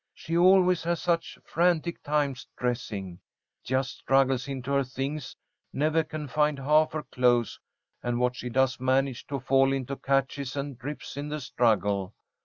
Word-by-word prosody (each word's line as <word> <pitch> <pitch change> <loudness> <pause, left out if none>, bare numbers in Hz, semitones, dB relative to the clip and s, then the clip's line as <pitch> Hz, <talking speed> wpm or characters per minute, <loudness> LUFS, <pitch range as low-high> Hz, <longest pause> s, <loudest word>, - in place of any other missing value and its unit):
She 165 - -4
always 180 0 +5
has 170 0 0
such 170 -1 -1
frantic 170 0 +1
times 145 -3 -1
dressing. 105 -7 -3 0.4
Just 130 +1 -1
struggles 135 -1 +2
into 135 -1 -4
her 140 0 +3
things, 135 +2 -5 0.4
never 155 +3 +1
can 155 -1 -6
find 150 +2 +1
half 150 +3 +3
her 155 -1 -3
clothes, 120 -2 +1 0.4
and 120 0 -1
what 125 0 +1
she 125 -1 -5
does 130 +1 +1
manage 130 0 0
to 140 -1 -3
fall 135 +1 +3
into 135 0 -2
catches 135 0 -1
and 140 -4 -5
rips 145 0 -6
in 145 +1 -4
the 150 +1 -3
struggle. 105 -6 0
135 Hz, 155 wpm, -27 LUFS, 125-150 Hz, 0.4 s, always